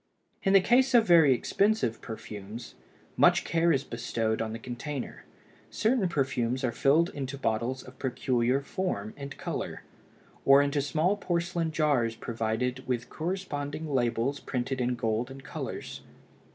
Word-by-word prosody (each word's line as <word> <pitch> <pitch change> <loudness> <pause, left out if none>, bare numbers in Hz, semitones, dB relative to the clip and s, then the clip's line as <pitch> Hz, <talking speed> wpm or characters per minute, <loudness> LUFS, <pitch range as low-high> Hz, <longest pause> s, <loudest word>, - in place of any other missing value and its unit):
In 195 - +2
the 195 - +8
case 255 +5 +4
of 230 -2 +6
very 165 -7 +6
expensive 130 - +1
perfumes, 110 +1 -8 0.4
much - - +5
care 170 +1 +2
is 135 -3 +2
bestowed 115 -3 -2
on 110 -1 -2
the 115 - -4
container; 125 +3 -6 0.4
certain 220 -4 +1
perfumes 130 -4 0
are 125 - +1
filled 155 +8 +3
into 140 -1 -5
bottles 120 +1 -1
of 130 0 -14
peculiar 125 0 +1
form 140 - -3
and 140 -1 -8
color, - - -4 0.6
or 135 0 +7
into 145 0 +1
small 160 +7 +1
porcelain 170 -3 -1
jars 140 -8 +1
provided 120 +3 -2
with 120 -2 -2
corresponding 155 -4 -3
labels 125 +2 +1
printed 130 0 -3
in 125 0 +1
gold 115 +1 -1
and 135 0 -10
colors. - - -6
135 Hz, 140 wpm, -29 LUFS, 120-160 Hz, 0.6 s, the